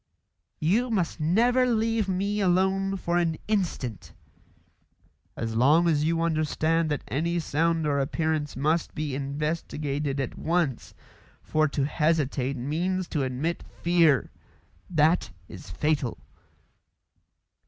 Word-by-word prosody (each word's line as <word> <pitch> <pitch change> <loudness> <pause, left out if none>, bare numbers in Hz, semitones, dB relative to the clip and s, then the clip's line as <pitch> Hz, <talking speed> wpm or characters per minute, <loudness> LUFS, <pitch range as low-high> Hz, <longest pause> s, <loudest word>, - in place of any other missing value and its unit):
"You 215 +11 +2
must 185 -7 -1
never 240 +11 +3
leave 225 -3 +1
me 200 +3 -1
alone 190 +1 +2
for 175 -1 0
an 165 -2 0
instant." 165 - -2 1.2
"As 115 -1 -3
long 150 +9 +4
as 150 -2 +2
you 165 +1 +1
understand 160 0 +1
that 150 -3 -2
any 170 +6 -1
sound 165 0 0
or 145 -1 +1
appearance 155 +1 -1
must 155 +5 0
be 150 -2 -3
investigated 145 0 -2
at 135 - -4
once, 165 -7 -1 0.5
for 155 0 +2
to 140 -1 -1
hesitate 145 -4 0
means 170 +8 -1
to 150 - -1
admit 135 +6 -2 0.2
fear. 165 -7 +3 0.6
That 160 -5 +2 0.2
is 90 - -11
fatal." 140 - -1
160 Hz, 115 wpm, -26 LUFS, 145-175 Hz, 1.2 s, long